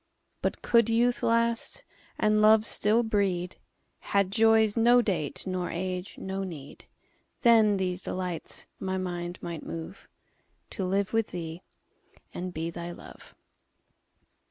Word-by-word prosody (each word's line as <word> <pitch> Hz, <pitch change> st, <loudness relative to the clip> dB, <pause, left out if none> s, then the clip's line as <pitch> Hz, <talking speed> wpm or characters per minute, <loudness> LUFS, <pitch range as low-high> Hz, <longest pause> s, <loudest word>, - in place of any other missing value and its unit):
But -, -, -2 dB
could 235 Hz, -2 st, +4 dB
youth 240 Hz, +2 st, +2 dB
last, 230 Hz, -, +1 dB, 0.3 s
and 215 Hz, 0 st, +3 dB
love 215 Hz, 0 st, +6 dB
still 225 Hz, +1 st, +2 dB
breed, 195 Hz, -5 st, -1 dB, 0.4 s
Had 200 Hz, -2 st, 0 dB
joys 220 Hz, 0 st, +4 dB
no 240 Hz, +2 st, +5 dB
date, 180 Hz, -, -2 dB
nor 185 Hz, -1 st, -2 dB
age 180 Hz, +1 st, -4 dB
no 190 Hz, +1 st, -4 dB
need, 150 Hz, -7 st, -9 dB, 0.6 s
Then 220 Hz, -4 st, +5 dB
these 180 Hz, -1 st, -2 dB
delights 180 Hz, -3 st, -4 dB
my 190 Hz, -1 st, -2 dB
mind 175 Hz, -1 st, -4 dB
might 170 Hz, -3 st, -5 dB
moveTo 165 Hz, +3 st, -7 dB, 0.8 s
live 200 Hz, +2 st, 0 dB
with 225 Hz, -1 st, +2 dB
thee 170 Hz, -1 st, -6 dB, 0.7 s
and 180 Hz, +1 st, -5 dB
be 165 Hz, 0 st, -4 dB
thy 170 Hz, 0 st, -6 dB
Love. 175 Hz, -, -12 dB
190 Hz, 125 wpm, -28 LUFS, 175-220 Hz, 0.8 s, love